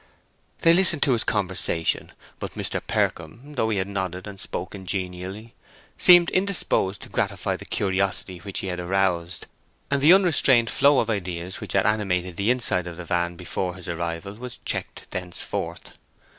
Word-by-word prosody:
They 165 Hz, -1 st, +6 dB
listened 175 Hz, -4 st, +4 dB
to 140 Hz, -, +3 dB
his 115 Hz, -, +1 dB
conversation, 95 Hz, -5 st, 0 dB, 0.3 s
but -, -, -6 dB
Mr. -, -, -2 dB
Percombe, 115 Hz, -, -2 dB
though 115 Hz, -5 st, 0 dB
he 105 Hz, -, 0 dB
had 95 Hz, 0 st, -1 dB
nodded 95 Hz, -2 st, -4 dB
and 100 Hz, -2 st, -9 dB
spoken 95 Hz, 0 st, -6 dB
genially, 95 Hz, +4 st, -4 dB, 0.4 s
seemed 175 Hz, -1 st, +7 dB
indisposed 185 Hz, -, +1 dB
to -, -, -11 dB
gratify -, -, -1 dB
the -, -, -9 dB
curiosity 95 Hz, -1 st, -1 dB
which 95 Hz, +2 st, -4 dB
he -, -, -4 dB
had 90 Hz, 0 st, -3 dB
aroused; 90 Hz, -2 st, 0 dB, 0.5 s
and 140 Hz, -1 st, +2 dB
the 150 Hz, +4 st, +7 dB
unrestrained 140 Hz, -, +4 dB
flow 140 Hz, +1 st, +4 dB
of 115 Hz, -2 st, +2 dB
ideas 90 Hz, -3 st, -4 dB
which -, -, -5 dB
had -, -, +3 dB
animated 95 Hz, -4 st, 0 dB
the 100 Hz, +5 st, 0 dB
inside 105 Hz, -8 st, +2 dB
of 85 Hz, -1 st, -7 dB
the 90 Hz, -, -7 dB
van 85 Hz, -1 st, -1 dB
before 90 Hz, +1 st, -3 dB
his 90 Hz, -2 st, -9 dB
arrival 85 Hz, +3 st, -4 dB
was 120 Hz, +3 st, -8 dB
checked -, -, -4 dB
thenceforward. 90 Hz, -1 st, -4 dB
95 Hz, 165 wpm, -24 LUFS, 90-115 Hz, 0.5 s, seemed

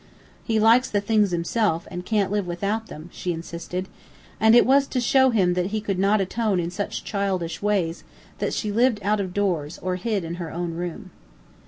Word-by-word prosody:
"He 220 Hz, -2 st, +1 dB
likes 230 Hz, +4 st, +5 dB
the 205 Hz, -, +1 dB
things 210 Hz, 0 st, +2 dB
himself 175 Hz, 0 st, 0 dB
and 180 Hz, -1 st, -5 dB
can't 205 Hz, -2 st, 0 dB
live 205 Hz, -3 st, -1 dB
without 200 Hz, +6 st, -2 dB
them," 155 Hz, +3 st, -10 dB
she 180 Hz, -, -3 dB
insisted. 170 Hz, +2 st, -5 dB, 0.5 s
And 220 Hz, +1 st, +6 dB
it 240 Hz, -, +7 dB
was 275 Hz, +1 st, +4 dB
to 255 Hz, -, -1 dB
show 260 Hz, +2 st, +4 dB
him 190 Hz, -7 st, +2 dB
that 180 Hz, 0 st, 0 dB
he 215 Hz, +2 st, -2 dB
could 200 Hz, -3 st, -3 dB
not 200 Hz, +2 st, +3 dB
atone 200 Hz, 0 st, 0 dB
in 170 Hz, 0 st, -2 dB
such 200 Hz, +2 st, -4 dB
childish 190 Hz, -5 st, -2 dB
ways 190 Hz, -5 st, 0 dB, 0.4 s
that -, -, -1 dB
she 210 Hz, -, -2 dB
lived 235 Hz, +2 st, +3 dB
out 210 Hz, +1 st, +1 dB
of 190 Hz, -2 st, -3 dB
doors 175 Hz, -6 st, -1 dB
or 180 Hz, 0 st, -3 dB
hid 205 Hz, 0 st, -1 dB
in 165 Hz, +1 st, -5 dB
her 165 Hz, -, -4 dB
own 170 Hz, 0 st, -3 dB
room. 175 Hz, 0 st, -6 dB
200 Hz, 200 wpm, -24 LUFS, 175-220 Hz, 0.5 s, it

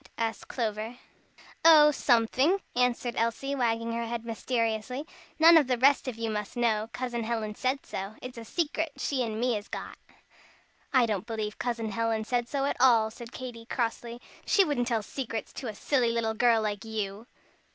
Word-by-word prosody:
asked 225 Hz, -1 st, -3 dB
Clover. 225 Hz, 0 st, -3 dB, 0.7 s
"Oh, 310 Hz, -2 st, +8 dB
somefing," 260 Hz, -, +3 dB, 0.2 s
answered 245 Hz, -1 st, +1 dB
Elsie, 230 Hz, +5 st, -1 dB
wagging 230 Hz, -3 st, 0 dB
her 235 Hz, 0 st, -2 dB
head 235 Hz, 0 st, -4 dB
mysteriously. 230 Hz, +3 st, -2 dB, 0.3 s
"None 330 Hz, +1 st, +8 dB
of 295 Hz, -5 st, +4 dB
the 250 Hz, -1 st, +1 dB
rest 275 Hz, +3 st, +4 dB
of 255 Hz, -, -3 dB
you 225 Hz, -1 st, -3 dB
must 210 Hz, +2 st, -4 dB
know, 220 Hz, -2 st, +1 dB
Cousin 240 Hz, 0 st, -3 dB
Helen 220 Hz, -2 st, -2 dB
said 260 Hz, +5 st, -2 dB
so, 195 Hz, +3 st, -5 dB
it's 250 Hz, -2 st, -8 dB
a -, -, -8 dB
secret 320 Hz, +3 st, -2 dB
she 275 Hz, -1 st, -1 dB
and 220 Hz, -2 st, -3 dB
me 245 Hz, +1 st, +1 dB
has 210 Hz, -1 st, -4 dB
got." -, -, -7 dB, 0.9 s
"I 255 Hz, -3 st, +5 dB
don't 215 Hz, -2 st, -2 dB
believe 215 Hz, -2 st, -4 dB
Cousin 230 Hz, -3 st, -2 dB
Helen 225 Hz, +1 st, 0 dB
said 240 Hz, +1 st, -1 dB
so 275 Hz, +2 st, -1 dB
at 280 Hz, -, -1 dB
all," 230 Hz, -4 st, +5 dB
said 235 Hz, +1 st, -10 dB
Katy, 235 Hz, -3 st, -8 dB
crossly. 235 Hz, -1 st, -3 dB, 0.2 s
"She 395 Hz, -, +4 dB
wouldn't 245 Hz, -6 st, 0 dB
tell 230 Hz, -4 st, 0 dB
secrets 230 Hz, -2 st, -5 dB
to 260 Hz, -, -6 dB
a 215 Hz, -, -5 dB
silly 250 Hz, +1 st, +1 dB
little 230 Hz, -1 st, 0 dB
girl 230 Hz, 0 st, +3 dB
like 205 Hz, -2 st, -2 dB
you." 215 Hz, 0 st, -4 dB
235 Hz, 180 wpm, -28 LUFS, 220-255 Hz, 0.9 s, Oh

